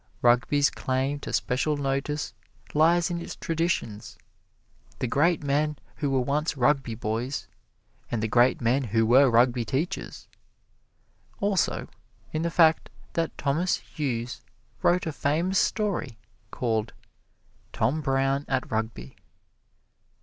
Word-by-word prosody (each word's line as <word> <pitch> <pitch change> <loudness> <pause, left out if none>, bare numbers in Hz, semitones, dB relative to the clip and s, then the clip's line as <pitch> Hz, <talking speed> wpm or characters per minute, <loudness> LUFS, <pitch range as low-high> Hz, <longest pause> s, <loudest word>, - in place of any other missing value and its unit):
Rugby's 125 +4 +4
claim 135 +2 -1
to - - -6
special 145 +4 0
notice 140 +2 -2 0.4
lies 170 +3 +3
in 170 0 -2
its - - -7
traditions 115 - -2 0.8
the - - -2
great 150 +6 +2
men 145 +1 0 0.2
who 145 - -1
were 135 -1 +2
once 150 +4 -1
Rugby 125 -2 +2
boys, 115 +5 -3 0.6
and 115 -2 -2
the - - +1
great 120 +4 +3
men 125 +4 +2
who 115 +1 +2
were 130 +4 +6
Rugby 120 +1 +3
teachers. 155 - -3 1.1
Also, 200 -2 0 0.5
in 155 - -1
the 170 - 0
fact 165 -1 +4 0.2
that 165 -1 -2
Thomas 155 +6 +1
Hughes 125 -6 -4 0.4
wrote 180 +1 +3
a 160 - -2
famous 165 +7 +1
story 180 - -1 0.3
called, 110 -2 -1 0.8
"Tom 155 +4 0
Brown 135 0 +1
at 130 -1 -1
Rugby." 110 - -3
140 Hz, 120 wpm, -26 LUFS, 120-155 Hz, 1.1 s, were